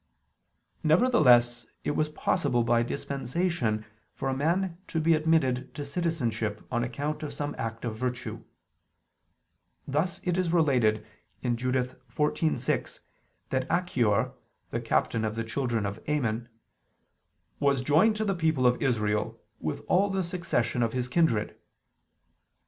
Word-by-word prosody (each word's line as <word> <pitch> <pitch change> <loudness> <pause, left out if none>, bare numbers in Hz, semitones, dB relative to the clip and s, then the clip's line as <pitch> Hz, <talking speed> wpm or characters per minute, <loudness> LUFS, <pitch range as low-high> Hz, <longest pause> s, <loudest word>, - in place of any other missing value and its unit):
Nevertheless 130 - +4 0.2
it - - 0
was 155 +1 0
possible 120 -5 +1
by 115 0 +3
dispensation 135 -2 -1 0.3
for 135 - -2
a - - 0
man 170 +5 0
to 165 - -1
be 165 +1 +4
admitted 150 -5 +1
to 145 - -4
citizenship 120 -10 -2
on 120 -1 +1
account 145 +5 -3
of 145 -2 -5
some 145 0 -3
act 115 +1 -4
of 110 -2 -3
virtue: 125 +1 -4 1.4
thus 175 +7 0
it 180 0 0
is 180 -3 +1
related 125 -10 +3 0.5
(Judith 125 +1 -1
14:6) 150 +1 0 0.5
that 130 0 0
Achior, 125 - +1 0.4
the 115 - -2
captain 115 0 +1
of 110 0 -1
the 115 - -2
children 115 -2 -1
of 100 +2 -4
Ammon, 120 -5 0 1.1
"was 140 -2 +2
joined 160 - +4
to 215 0 -1
the 200 - +1
people 160 -7 +1
of 125 0 +3
Israel, 105 -5 0 0.2
with 80 -1 -4
all 195 +3 +3
the 195 -1 0
succession 170 -9 -1
of 115 -1 +1
his 125 -1 -1
kindred." 125 -7 +1
130 Hz, 130 wpm, -28 LUFS, 120-160 Hz, 1.4 s, Nevertheless